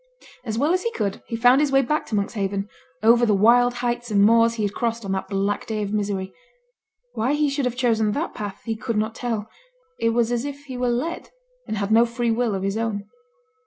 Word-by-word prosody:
As 220 Hz, -3 st, -3 dB
well 295 Hz, +7 st, +2 dB
as 365 Hz, -, +1 dB
he 465 Hz, -, -2 dB
could, 200 Hz, -2 st, -2 dB
he 230 Hz, -, -3 dB
found 245 Hz, +4 st, +5 dB
his 295 Hz, -2 st, +1 dB
way 270 Hz, 0 st, +4 dB
back 300 Hz, +5 st, -1 dB
to 220 Hz, -, -2 dB
Monkshaven, 200 Hz, -1 st, -2 dB, 0.4 s
over 235 Hz, +2 st, +5 dB
the 215 Hz, -3 st, +4 dB
wild 245 Hz, +4 st, +4 dB
heights 240 Hz, 0 st, -2 dB
and 200 Hz, -2 st, +3 dB
moors 230 Hz, +2 st, +5 dB
he 220 Hz, -, -2 dB
had 200 Hz, -1 st, -1 dB
crossed 230 Hz, -2 st, -2 dB
on 195 Hz, -, -3 dB
that 190 Hz, 0 st, -2 dB
black 200 Hz, +1 st, -1 dB
day 215 Hz, -2 st, -2 dB
of 205 Hz, 0 st, -4 dB
misery; 200 Hz, -2 st, -2 dB, 0.8 s
why 245 Hz, +6 st, 0 dB
he 295 Hz, -1 st, +1 dB
should 280 Hz, -1 st, -1 dB
have 250 Hz, -1 st, -1 dB
chosen 225 Hz, -4 st, +1 dB
that 315 Hz, +7 st, -3 dB
path 205 Hz, -2 st, -6 dB
he 225 Hz, -1 st, -2 dB
could 225 Hz, 0 st, -3 dB
not 220 Hz, +1 st, 0 dB
tell 225 Hz, -4 st, -3 dB, 0.5 s
it 230 Hz, -, +2 dB
was 235 Hz, 0 st, +1 dB
as 240 Hz, 0 st, 0 dB
if 285 Hz, 0 st, -6 dB
he 260 Hz, -2 st, -7 dB
were 245 Hz, 0 st, 0 dB
led, 275 Hz, +9 st, -2 dB, 0.4 s
and 215 Hz, -, -3 dB
had 200 Hz, +1 st, -2 dB
no 230 Hz, +2 st, +5 dB
free 235 Hz, 0 st, -1 dB
will 230 Hz, -2 st, 0 dB
of 190 Hz, -, -3 dB
his 195 Hz, +2 st, -1 dB
own. 220 Hz, -3 st, -2 dB
230 Hz, 235 wpm, -23 LUFS, 210-245 Hz, 0.8 s, found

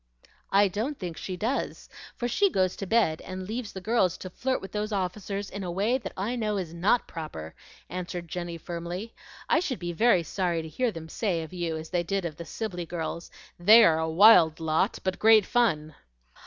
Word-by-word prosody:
"I 200 Hz, +1 st, +5 dB
don't 225 Hz, +10 st, -3 dB
think 175 Hz, -4 st, -5 dB
she 185 Hz, +2 st, -5 dB
does, 235 Hz, +8 st, -2 dB, 0.3 s
for 240 Hz, -, -2 dB
she 395 Hz, +12 st, +3 dB
goes 185 Hz, -, +1 dB
to 195 Hz, -, -5 dB
bed 210 Hz, -7 st, +2 dB
and 185 Hz, 0 st, -7 dB
leaves 220 Hz, 0 st, -4 dB
the 190 Hz, -, -7 dB
girls 190 Hz, -4 st, +1 dB
to 185 Hz, -, -8 dB
flirt 260 Hz, +7 st, -1 dB
with 195 Hz, -, -9 dB
those 210 Hz, +1 st, -3 dB
officers 200 Hz, +1 st, -3 dB
in 200 Hz, 0 st, -5 dB
a 180 Hz, -, -4 dB
way 205 Hz, +9 st, +1 dB
that -, -, -7 dB
I 210 Hz, +6 st, -2 dB
know 215 Hz, -3 st, -1 dB
is 175 Hz, -4 st, -4 dB
NOT 195 Hz, +8 st, +2 dB
proper," 115 Hz, -, -7 dB, 0.3 s
answered 180 Hz, -1 st, -5 dB
Jenny, 175 Hz, 0 st, -5 dB
firmly. 175 Hz, +6 st, -6 dB, 0.3 s
"I 315 Hz, -, +4 dB
should 310 Hz, -8 st, -2 dB
be 175 Hz, -1 st, -4 dB
very 205 Hz, -2 st, +4 dB
sorry 170 Hz, -1 st, -1 dB
to -, -, -7 dB
hear 245 Hz, +10 st, 0 dB
them 165 Hz, -4 st, -8 dB
say 175 Hz, -2 st, -1 dB
of 160 Hz, -, -10 dB
you 170 Hz, -3 st, -2 dB
as 160 Hz, 0 st, -8 dB
they 175 Hz, -1 st, +1 dB
did 195 Hz, +1 st, -2 dB
of 155 Hz, -3 st, -5 dB
the 170 Hz, -, -7 dB
Sibley 180 Hz, -4 st, -5 dB
girls, 170 Hz, 0 st, -4 dB, 0.3 s
'They 215 Hz, +6 st, +8 dB
are 160 Hz, -6 st, +4 dB
a 160 Hz, 0 st, -1 dB
wild 170 Hz, -3 st, +6 dB
lot, 160 Hz, -1 st, +1 dB
but 185 Hz, -1 st, -2 dB
great 220 Hz, -2 st, +6 dB
fun.'" 155 Hz, -12 st, +1 dB
185 Hz, 210 wpm, -27 LUFS, 170-215 Hz, 0.3 s, They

